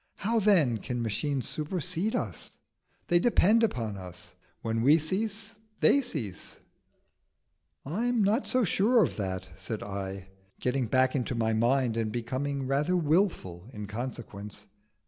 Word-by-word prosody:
How 225 Hz, +3 st, +1 dB
then 170 Hz, -, +4 dB
can 120 Hz, +2 st, -3 dB
machines 130 Hz, +5 st, -1 dB
supersede 180 Hz, +5 st, -2 dB
us? -, -, -4 dB, 0.5 s
they 175 Hz, -, +5 dB
depend 225 Hz, +1 st, +4 dB
upon 115 Hz, -, -1 dB
us. 90 Hz, -1 st, -9 dB, 0.3 s
When 115 Hz, 0 st, 0 dB
we 145 Hz, +6 st, +6 dB
cease, 205 Hz, +6 st, -2 dB, 0.3 s
they 280 Hz, -, +5 dB
cease." 135 Hz, -, -5 dB, 1.3 s
"I 185 Hz, -, -2 dB
am 245 Hz, -3 st, +2 dB
not 215 Hz, +7 st, +2 dB
so 255 Hz, -1 st, +2 dB
sure 220 Hz, +4 st, +4 dB
of -, -, -1 dB
that," 95 Hz, -2 st, -3 dB
said 95 Hz, +3 st, -5 dB
I, 95 Hz, -1 st, -5 dB, 0.3 s
getting 125 Hz, -1 st, 0 dB
back 130 Hz, +2 st, +3 dB
into 125 Hz, -2 st, -1 dB
my 110 Hz, -1 st, +1 dB
mind, 120 Hz, +1 st, +2 dB
and 110 Hz, -2 st, -1 dB
becoming 130 Hz, +4 st, -2 dB
rather 145 Hz, +7 st, +1 dB
wilful 155 Hz, -, 0 dB
in 105 Hz, -1 st, -6 dB
consequence. 105 Hz, -2 st, -7 dB
130 Hz, 140 wpm, -29 LUFS, 110-185 Hz, 1.3 s, we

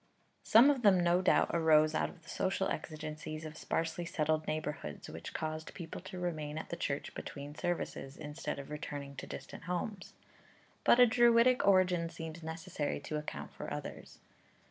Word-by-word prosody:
Some 235 Hz, +6 st, +7 dB
of 270 Hz, -3 st, -1 dB
them 200 Hz, -5 st, +6 dB
no 175 Hz, +1 st, +3 dB
doubt -, -, +4 dB
arose 155 Hz, -2 st, +5 dB
out -, -, +1 dB
of 165 Hz, -, -15 dB
the 165 Hz, -, -15 dB
social 190 Hz, 0 st, 0 dB
exigencies 155 Hz, 0 st, -5 dB
of 155 Hz, 0 st, -7 dB
sparsely 165 Hz, +2 st, -2 dB
settled 155 Hz, -1 st, 0 dB
neighbourhoods, 150 Hz, -, -4 dB
which -, -, -7 dB
caused 155 Hz, 0 st, -4 dB
people 170 Hz, -2 st, -7 dB
to 185 Hz, 0 st, -8 dB
remain 155 Hz, -4 st, -3 dB
at -, -, -5 dB
the -, -, -3 dB
church 145 Hz, -4 st, -3 dB
between 145 Hz, 0 st, -7 dB
services, 150 Hz, -4 st, -3 dB
instead 150 Hz, 0 st, -5 dB
of 140 Hz, +1 st, -8 dB
returning 145 Hz, -2 st, -5 dB
to -, -, -6 dB
distant -, -, -8 dB
homes; 185 Hz, +2 st, -3 dB, 0.7 s
but 240 Hz, -, +6 dB
a 250 Hz, -, +10 dB
Druidic 240 Hz, 0 st, +5 dB
origin 180 Hz, -3 st, +4 dB
seems 165 Hz, 0 st, -7 dB
necessary 160 Hz, -1 st, -3 dB
to 150 Hz, +1 st, -3 dB
account 150 Hz, -, -6 dB
for -, -, -7 dB
others. -, -, -6 dB
160 Hz, 165 wpm, -33 LUFS, 155-185 Hz, 0.7 s, a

